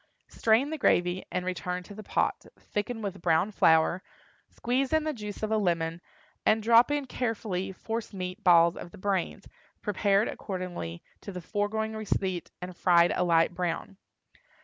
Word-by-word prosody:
Strain 230 +6 +2
the 315 - -4
gravy 180 -6 +2
and 180 - -2
return 180 0 -3
to 205 - -11
the 215 - -8
pot, 210 - -1
thicken 220 +2 -4
with 195 -3 -5
brown 170 +5 +2
flour, 165 -1 +4 0.5
squeeze 255 +2 -1
in 315 -1 +3
the 310 0 -1
juice 210 -4 -7
of 215 - -1
a 220 - +3
lemon, 170 -3 -1 0.4
and 220 0 +3
drop 230 +3 +6
in 290 -1 0
carefully 220 -7 -3
force 225 +4 -5
meat 185 -2 -6
balls 170 -1 +6
of - - -8
the - - -14
brains, 190 -2 -2 0.4
prepared 205 0 +2
according 180 - -5 0.2
to 200 - -7
the 180 - -6
foregoing 215 +4 -2
receipt 190 -4 -2
and 180 0 -7
fried 170 -1 +4
a 180 - +1
light 165 0 +3
brown. 175 +2 -3
195 Hz, 165 wpm, -28 LUFS, 175-220 Hz, 0.5 s, drop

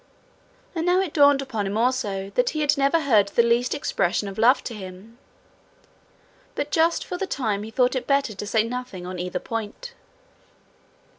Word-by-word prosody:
And 325 -3 -2
now 360 +2 +3
it 380 -5 -2
dawned 285 -2 +5
upon 220 -7 -3
him 200 +2 -2
also 205 -5 -1
that 245 +4 +1
he 310 - -3
had 295 0 +3
never 280 +4 +2
heard 220 -9 +3
the 235 +4 +2
least 235 +1 +1
expression 195 -6 -1
of 195 +1 -7
love 250 +4 +4
to 235 - -5
him. 200 +3 -10 1.4
But - - -3
just 330 0 +2
for 360 - -5
the 390 - -3
time 215 - -1
he 215 - -7
thought 250 +3 +1
it 255 - -3
better 275 -5 +1
to 205 +1 -7
say 220 +1 +2
nothing 240 -6 -6
on 180 0 -6
either 180 +1 -3
point. 225 - -6
235 Hz, 180 wpm, -24 LUFS, 205-280 Hz, 1.4 s, dawned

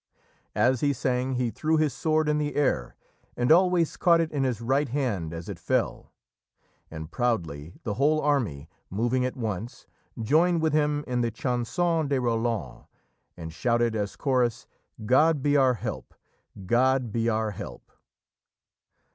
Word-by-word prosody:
As 125 0 +2
he 145 -1 +2
sang, 125 0 -1
he 125 -2 0
threw 155 +8 0
his 155 -4 +1
sword 155 +2 +1
in 150 0 +1
the 150 -1 -2
air 130 - 0 0.4
and 125 +4 +2
always 175 -1 +4
caught 170 -2 +4
it 165 -1 0
in 140 -2 -1
his 125 -5 -1
right 135 +4 0
hand 115 - -2
as 85 0 -7
it - - -7
fell, - - -1 0.8
and, 80 0 -8
proudly, 85 - -2
the 105 - -2
whole 150 +7 +2
army, 120 - 0 0.2
moving 120 +6 0
at 130 - -4
once, 110 -1 -5 0.3
joined 165 +9 +3
with 160 -2 +1
him 150 -1 +1
in 125 -1 -1
the 120 - +1
Chanson 140 +8 -1
de 140 -1 +1
Roland, 115 - -2 0.5
and 80 -2 -7
shouted, 120 +5 +1
as 105 -2 -2
chorus, 125 -4 0 0.4
"God 150 +4 +3
be 145 0 +2
our 130 -3 +4
help! - - -6 0.5
God 125 +2 +2
be 115 +1 0
our 110 -1 0
help!" 100 - -9
125 Hz, 155 wpm, -26 LUFS, 110-145 Hz, 0.8 s, always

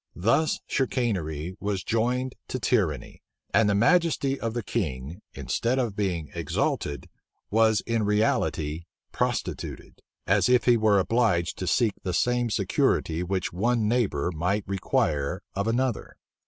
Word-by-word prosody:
Thus 115 - +2
chicanery 95 - -1
was 100 -2 -2
joined 125 +3 0
to 130 - -3
tyranny; 90 - -1 0.3
and 105 +1 +4
the 100 - +2
majesty 140 - +2
of 115 0 -3
the 120 - -2
king, 80 - -3
instead 120 +3 -1
of 120 -6 -1
being 90 -7 -2
exalted, 70 -1 -2 0.4
was 110 0 +4
in 115 -1 -1
reality 85 -7 0 0.3
prostituted; - - -3 0.2
as - - +3
if 125 -1 +4
he 120 - +6
were 110 -3 +3
obliged 95 -4 +1
to 95 - -3
seek 115 -1 +2
the 90 -3 -2
same 120 +2 +1
security 85 -5 +1
which 95 0 -2
one 110 +4 +1
neighbor 100 - 0
might 90 +5 -1
require 75 -6 -1
of 100 +2 -2
another. 120 +1 -1
105 Hz, 135 wpm, -26 LUFS, 90-120 Hz, 0.4 s, he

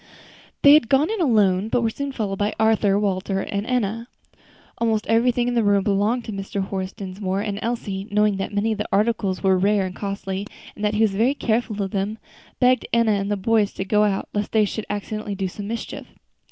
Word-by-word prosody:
They 285 - +9
had 295 -6 +5
gone 285 +7 +3
in 440 -4 -2
alone, 210 - +3
but 240 - +1
were 225 - +1
soon 280 +4 -4
followed 205 -6 -3
by 210 +1 0
Arthur, 220 -3 +3
Walter 195 -1 -1
and 200 +3 -3
Enna. 230 -2 -1 0.7
Almost 220 -2 +1
everything 240 +2 +2
in 245 - 0
the 235 -2 +2
room 200 -1 +3
belonged 210 +4 +1
to - - -5
Mr. 195 0 -4
Horace 190 -1 -4
Dinsmore; 195 -1 -4
and 205 -1 -3
Elsie, 205 -4 -3
knowing 210 -1 +2
that 195 - -3
many 205 +2 0
of 215 - -3
the 210 - -2
articles 205 -2 0
were 190 -1 +3
rare 200 0 +2
and 185 -1 -6
costly, 195 0 -4 0.3
and 210 - -8
that 210 0 +1
he 215 - +1
was 210 -3 +2
very 235 +8 +2
careful 220 -4 -1
of 195 - -4
them, 200 +2 -2 0.4
begged 255 0 +3
Enna 230 -1 +3
and 200 -1 0
the 205 - 0
boys 210 +1 +1
to 190 - -4
go 210 +2 +3
out, 200 -2 0
lest 205 0 -2
they 215 -1 +4
should 215 +2 -5
accidentally 210 0 -4
do 190 -1 -2
some 200 +2 -7
mischief. 230 +2 -5
210 Hz, 215 wpm, -22 LUFS, 195-225 Hz, 0.7 s, They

